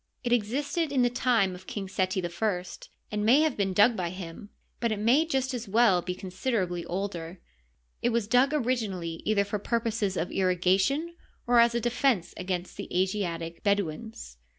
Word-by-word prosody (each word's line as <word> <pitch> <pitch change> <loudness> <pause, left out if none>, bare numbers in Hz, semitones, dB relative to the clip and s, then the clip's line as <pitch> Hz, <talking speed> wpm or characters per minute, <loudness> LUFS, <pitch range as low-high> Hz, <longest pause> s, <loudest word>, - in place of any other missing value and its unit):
It 240 -1 +1
existed 280 +8 0
in 260 -3 +3
the 245 - +2
time 235 -6 +2
of 180 +1 -12
King 200 -2 -5
Seti 185 -1 -1
I, 180 +1 -1 0.5
and 210 0 -1
may 250 +8 +6
have 310 -4 +1
been 195 -2 0
dug 210 +5 +5
by 180 -3 -2
him, 185 +2 -8 0.3
but 235 -1 0
it 215 - -1
may 250 +10 +3
just 265 -3 -1
as 240 -2 -4
well 205 -3 +4
be 180 +1 -4
considerably 185 -2 -2
older. 180 -2 -4 0.6
It 240 - +2
was 235 -3 0
dug 250 +4 +4
originally 220 - -2
either 210 -2 +3
for 205 +1 -3
purposes 225 -3 -1
of 170 - -2
irrigation 190 - +1 0.3
or 240 0 +4
as 235 0 +5
a - - +2
defense 240 -5 +1
against 180 -1 -4
the - - -6
Asiatic 170 -4 -2
Bedouins. 200 - -2
205 Hz, 175 wpm, -28 LUFS, 185-240 Hz, 0.6 s, may